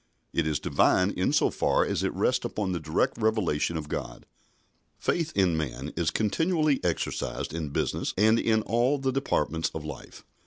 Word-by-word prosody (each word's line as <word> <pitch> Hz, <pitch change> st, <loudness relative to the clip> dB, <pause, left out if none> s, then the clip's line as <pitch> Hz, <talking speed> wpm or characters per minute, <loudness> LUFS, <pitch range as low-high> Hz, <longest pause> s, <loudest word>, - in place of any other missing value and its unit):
It 80 Hz, -, +1 dB
is 75 Hz, -1 st, 0 dB
Divine 95 Hz, +2 st, +3 dB
in 90 Hz, -, 0 dB
so -, -, +3 dB
far -, -, +2 dB
as -, -, -1 dB
it -, -, 0 dB
rests -, -, +1 dB
upon 100 Hz, -3 st, -2 dB
the 90 Hz, -, -1 dB
direct 80 Hz, +8 st, 0 dB
revelation 105 Hz, -8 st, +1 dB
of 75 Hz, -2 st, -5 dB
God. -, -, -5 dB, 0.7 s
Faith 165 Hz, -2 st, -1 dB
in 95 Hz, -4 st, +3 dB
man 70 Hz, -2 st, -4 dB
is 80 Hz, -2 st, +1 dB
continually 155 Hz, -, +1 dB
exercised 85 Hz, -2 st, -2 dB
in 80 Hz, -3 st, -3 dB
business 70 Hz, -, -1 dB
and 110 Hz, +3 st, +4 dB
in 110 Hz, -1 st, +2 dB
all 120 Hz, +6 st, +2 dB
the 135 Hz, -1 st, -1 dB
departments 80 Hz, -, 0 dB
of 80 Hz, -1 st, -5 dB
life. 75 Hz, -3 st, -9 dB
90 Hz, 170 wpm, -27 LUFS, 80-115 Hz, 0.7 s, and